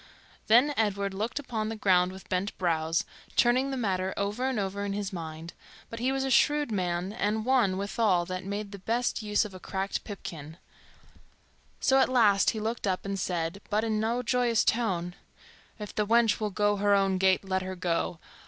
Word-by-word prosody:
Then 245 +7 +5
Edward 200 -2 0
looked 220 +7 -3
upon 225 -6 -3
the 225 - -4
ground 185 -4 +3
with 190 0 -12
bent 185 +3 -2
brows, 165 -2 0 0.3
turning 255 +3 +3
the 270 - -3
matter 190 -5 -1
over 210 +6 -1
and 260 - -2
over 200 0 -2
in 200 -1 -2
his 200 -1 -3
mind; 165 -1 -7 0.4
but 230 - -6
he 255 +3 +1
was 270 0 -1
a 270 - -1
shrewd 295 +1 +3
man 180 -1 -1
and 215 0 -1
one, 245 -8 +3
withal, 200 -3 +1
that 185 +1 -5
made 200 +1 -4
the 200 - -8
best 230 +5 -1
use 210 0 +1
of 205 - -8
a 185 - -9
cracked 195 +1 -3
pipkin; 160 -6 -8 1.2
so 270 -1 +4
at 265 - +3
last 215 -6 +4
he 220 - -2
looked 220 0 -3
up 185 0 -1
and 195 0 -3
said, 175 +1 -2
but 215 0 +1
in 220 -1 0
no 230 +3 0
joyous 240 -2 +2
tone, 185 -7 0 0.6
"If 210 -2 -7
the 210 -1 -1
wench 230 0 +3
will 215 -1 -1
go 205 +1 +1
her 205 0 +3
own 195 -1 +2
gait, 190 +1 +3
let 190 0 0
her 185 0 -5
go. 175 -1 -1
205 Hz, 195 wpm, -28 LUFS, 185-230 Hz, 1.2 s, Then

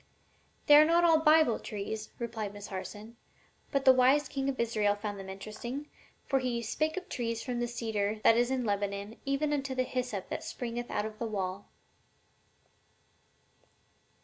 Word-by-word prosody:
"They 295 - +9
are 300 - +9
not 335 +2 +4
all 325 -2 +6
Bible 310 -6 +5
trees," 215 +1 -5
replied 220 -4 -4
Miss 205 0 -8
Harson. 210 +4 -7 0.5
"But 275 -2 0
the 260 - +9
wise 260 +4 +4
king 270 0 -2
of 265 - -3
Israel 215 -3 +1
found 205 -1 -5
them 190 0 -8
interesting, 215 +9 -6 0.3
for 270 - +1
he 245 -2 -2
'spake 310 - -1
of 375 - -5
trees, 230 -2 -3
from 245 -2 -3
the 240 - 0
cedar 220 -3 -1
tree 215 - -11
that 225 - +7
is 240 +1 +2
in 260 -2 -1
Lebanon 200 +1 -2
even 285 +2 +1
unto 275 -2 -2
the 255 - +2
hyssop 250 -6 -3
that - - -4
springeth 240 0 -5
out 210 - -1
of 215 0 -7
the 230 - -2
wall.'" 195 -2 -3
235 Hz, 175 wpm, -31 LUFS, 210-270 Hz, 0.5 s, They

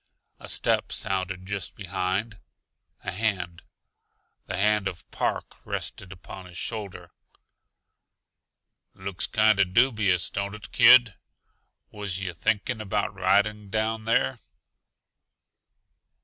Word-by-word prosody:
A - - -10
step - - +1
sounded 95 -1 -2
just 100 -3 -4
behind. 95 +2 -2 0.6
A - - -3
hand, 90 -4 -1 0.9
the - - -3
hand 105 0 +3
of 90 -3 -7
Park, - - -2
rested 95 - -5
upon 95 0 -10
his 90 -1 -11
shoulder. 105 -4 -5 1.8
"Looks 95 -1 -2
kinda 110 -2 +4
dubious, 100 -3 +2
don't 100 +1 -3
it, 105 - -11
kid? 120 -2 +7 0.8
Was 100 -3 -4
yuh 95 -2 -4
thinking 110 +7 0
about 105 0 -1
riding 100 +2 +1
down 110 +1 -1
there?" 125 +2 +2
100 Hz, 105 wpm, -26 LUFS, 95-110 Hz, 1.8 s, kid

